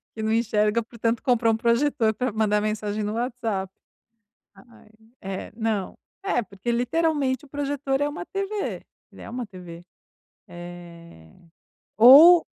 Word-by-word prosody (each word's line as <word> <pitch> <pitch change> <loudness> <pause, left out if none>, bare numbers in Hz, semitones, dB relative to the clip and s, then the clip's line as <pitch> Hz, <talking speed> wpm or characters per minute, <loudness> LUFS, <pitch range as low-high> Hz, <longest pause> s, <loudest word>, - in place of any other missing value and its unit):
Que 220 - -6
não 220 0 -1
enxerga 220 0 +1
portanto 230 0 -3
comprou 235 -3 +2
um - - -1
projetor 235 0 +1
para 250 +1 -2
mandar 210 -1 +1
mensagem 215 0 -3
no 210 - -3
WhatsApp. 230 -5 -3 0.8
Ai, 215 +2 -20 0.3
é, 190 0 -6
não, 220 -4 -2 0.3
é 320 -12 0
porque 200 +3 -6
literalmente 270 +1 0
o 290 - -17
projetor 280 -1 -2
é 290 - +1
uma 295 +4 -6
TV, 395 +2 -4 0.3
ele - - -15
é - - -9
uma 245 0 -5
TV. 180 -4 -11 0.7
Eh, 170 - -12 0.7
ou 300 +10 +9
230 Hz, 140 wpm, -24 LUFS, 210-265 Hz, 0.8 s, ou